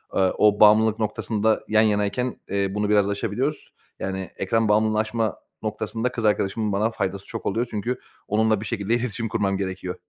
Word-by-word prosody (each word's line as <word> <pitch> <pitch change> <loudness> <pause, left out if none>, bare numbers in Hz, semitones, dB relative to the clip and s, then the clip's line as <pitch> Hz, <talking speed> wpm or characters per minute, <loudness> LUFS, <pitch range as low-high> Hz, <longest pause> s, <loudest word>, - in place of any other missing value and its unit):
ııı, 95 -1 +3
o 105 -1 +4
bağımlılık 110 +1 +6
noktasında 110 0 0
yan 110 0 +4
yanayken, 110 +4 0
eee, 100 0 +1
bunu 105 0 0
biraz 105 -1 +3
aşabiliyoruz. 115 +8 -2 0.3
Yani, 95 -1 -4
ekran 110 +3 +1
bağımlılığını 110 0 +3
aşma 110 -2 0 0.3
noktasında 110 +3 -2
kız 115 -3 -3
arkadaşımın 105 +1 +1
bana 105 +3 +1
faydası 100 -2 -3
çok - - -7
oluyor. 115 +5 0
Çünkü 115 +4 -3 0.3
onunla 110 0 +2
bir - - -6
şekilde 105 +1 0
iletişim 115 -2 -2
kurmam 100 -2 0
gerekiyor. 95 -1 -4
105 Hz, 165 wpm, -24 LUFS, 100-110 Hz, 0.3 s, bağımlılık